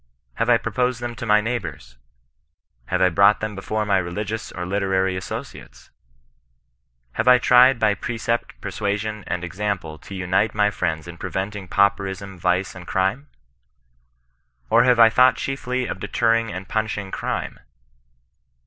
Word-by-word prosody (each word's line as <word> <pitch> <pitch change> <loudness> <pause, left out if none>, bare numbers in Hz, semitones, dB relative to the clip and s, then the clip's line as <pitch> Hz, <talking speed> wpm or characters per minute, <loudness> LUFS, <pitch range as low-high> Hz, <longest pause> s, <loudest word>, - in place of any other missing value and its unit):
Have 115 - -1
I 120 - +6
proposed 125 0 -1
them 120 0 -4
to 115 - -5
my 105 0 +5
neighbours? 115 - -5 0.9
Have - - +1
I 90 - +5
brought 100 +4 +4
them 110 0 -4
before 105 +2 -3
my 100 -2 +2
religious 105 +5 -4
or 90 - -5
literary 95 0 0
associates 95 - -8 1.2
1 - - -15
Have 110 - 0
I 125 0 +8
tried 125 +1 +6
by 110 -2 +3
precept, 115 - -3
persuasion, 105 +1 -3
and 90 - -3
example 90 -3 -4
to 100 - -10
unite 95 +4 0
my 105 -1 +3
friends 80 -5 -2
in 85 -1 -9
preventing 95 0 -4
pauperism, 100 -1 0
vice, 90 +2 0
and 90 -1 -11
crime 95 +10 -1 1.4
1 - - +5
Or - - +6
have 125 -1 +4
I 115 -1 +8
thought 125 +2 +5
chiefly 130 -2 -3
of - - -5
deterring 115 -1 +1
and 95 +1 -7
pimishing 105 -3 -2
crime - - -4
105 Hz, 150 wpm, -22 LUFS, 95-115 Hz, 1.4 s, I